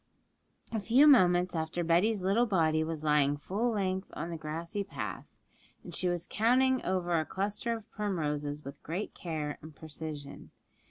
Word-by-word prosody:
A 225 - -1
few 240 +8 +5
moments 180 -10 +5
after 160 +2 -2
Betty's 185 +5 +2
little 215 +6 +3
body 160 -6 +2
was 160 -1 -4
lying 145 -1 +3
full 200 +11 -1
length 190 -3 -1
on 170 - -4
the - - -3
grassy 165 +5 -4
path, 130 - -6 0.6
and - - -9
she 180 - +1
was 175 -1 -1
counting 255 +4 +3
over 180 -2 0
a - - 0
cluster 200 +7 -2
of 220 - -14
primroses 150 -8 -2
with 140 +1 -9
great 180 +7 -4
care 155 -4 -4
and 155 0 -11
precision. 150 -1 -7
175 Hz, 160 wpm, -31 LUFS, 155-205 Hz, 0.6 s, few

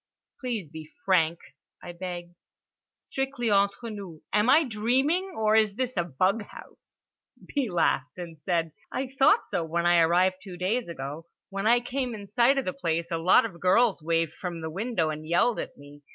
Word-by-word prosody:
"Please 235 - -3
be 155 +1 -10 0.2
frank," 170 -3 +3 0.5
I 175 - -7
begged. 175 0 -7 0.6
"Strictly 270 -4 -3
entre 200 +3 +1
nous: 190 -7 -9
am 210 +3 +3
I 310 +5 +6
dreaming, 265 - 0
or 215 0 +3
is 215 -2 +3
this 255 +1 -2
a 175 - +1
bug 185 +8 +1
house?" - - -12 0.4
B. 275 -6 -1
laughed, 160 -5 0
and 170 -3 -8
said: 165 0 -1 0.2
"I 260 0 -3
thought 410 +12 +5
so 170 - -1
when 170 +2 -1
I 175 0 +5
arrived 180 +3 +3
two 185 -3 -9
days 195 +4 -1
ago. 150 +1 -6 0.2
When 195 +2 -2
I 240 +1 +5
came 250 -1 -3
in 205 -1 -8
sight 235 +7 +3
of 270 - 0
the 185 - -2
place 170 -1 -2
a 165 - -1
lot 180 +6 +5
of 180 -6 -7
girls 195 +1 +3
waved 165 0 0
from 175 -3 -6
the 160 0 -4
window 190 -4 -1
and 155 0 -6
yelled 175 +8 +2
at - - -6
me. 145 +1 -14
185 Hz, 185 wpm, -27 LUFS, 170-235 Hz, 0.6 s, I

